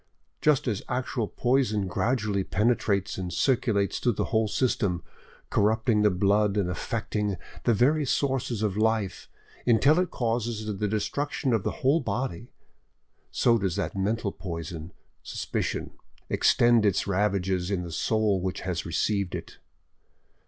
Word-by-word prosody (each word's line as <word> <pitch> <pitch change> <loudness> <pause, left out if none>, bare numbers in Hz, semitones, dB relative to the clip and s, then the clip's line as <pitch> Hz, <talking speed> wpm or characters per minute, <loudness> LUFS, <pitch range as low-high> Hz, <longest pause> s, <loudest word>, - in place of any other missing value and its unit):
Just 150 -2 +3
as 105 -5 -1
actual 125 -2 -1
poison 120 -5 +1
gradually 105 0 0
penetrates 105 -2 0
and 90 -1 -4
circulates 105 -2 +1
through 120 - +1
the - - -1
whole 110 0 +3
system, 100 -7 0 0.5
corrupting 110 +1 +2
the 105 - +5
blood 100 +2 +2
and 100 -3 +1
affecting 100 +4 -2 0.3
the 120 - +4
very 145 +8 +3
sources 130 -5 0
of 100 -3 0
life 110 -3 0 0.4
until 135 +8 +5
it 180 -1 +1
causes 115 -2 -2
the 105 - +1
destruction 130 +5 -1
of 110 - +2
the - - -1 0.2
whole 145 +5 +5
body, 120 - -3 0.8
so 115 -1 +3
does 95 -4 -1
that 80 - -2
mental 100 +2 -1
poison, 85 -2 -6 0.3
suspicion, - - -3 0.4
extend 120 -2 +4
its 100 -2 +2
ravages 95 -2 0
in 95 -3 -1
the 85 - -7
soul 105 +1 +1
which 95 0 -3
has 90 -3 -3
received 100 +2 0
it. - - -8
105 Hz, 140 wpm, -27 LUFS, 95-120 Hz, 0.8 s, the